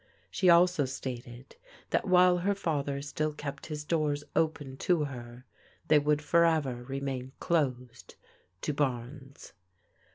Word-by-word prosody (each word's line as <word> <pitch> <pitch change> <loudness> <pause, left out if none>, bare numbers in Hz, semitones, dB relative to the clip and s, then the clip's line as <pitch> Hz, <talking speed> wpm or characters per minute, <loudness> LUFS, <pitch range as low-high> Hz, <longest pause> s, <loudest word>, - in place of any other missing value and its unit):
She 185 - +2
also 170 -3 +5
stated 130 -1 -7 0.3
that - - +1
while 180 -1 +5
her 200 +3 0
father 140 -6 -2
still 155 +1 -2
kept 145 -1 -7
his 150 -2 -5
doors 150 -2 0
open 145 -4 -1
to 170 +1 +1
her, 125 -3 -8 0.4
they 150 - +6
would 150 +1 +1
forever 155 -6 +2
remain 135 0 -4
closed 125 -7 -2 0.5
to 150 - -1
Barnes. 135 0 -4
145 Hz, 125 wpm, -30 LUFS, 130-160 Hz, 0.5 s, they